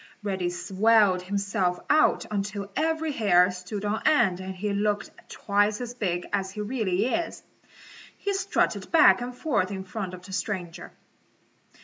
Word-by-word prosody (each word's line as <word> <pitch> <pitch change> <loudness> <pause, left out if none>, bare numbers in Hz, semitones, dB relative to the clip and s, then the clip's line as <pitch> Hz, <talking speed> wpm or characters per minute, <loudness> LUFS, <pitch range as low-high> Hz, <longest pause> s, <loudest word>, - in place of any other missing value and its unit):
Reddy 190 -3 -1
swelled 190 +2 +3
himself 190 -1 -1
out 310 +1 +3
until 200 -1 -3
every 320 0 0
hair 185 -7 +4
stood 180 +3 -6
on 210 +1 -1
end 195 -13 +3
and 190 0 -6
he 205 +2 -2
looked 205 0 -1 0.2
twice 205 0 0
as 245 -1 -5
big 180 -7 -2
as 195 -2 0
he 210 +2 -6
really 210 -3 0
is. 335 +7 -2 0.7
He 400 - -2
strutted 390 - -1
back 320 -6 +6
and 245 0 -6
forth 250 -12 0
in 190 -2 -5
front 190 -1 -5
of 180 0 -14
the 190 - -10
stranger. 180 -4 -4
200 Hz, 150 wpm, -26 LUFS, 185-225 Hz, 0.7 s, back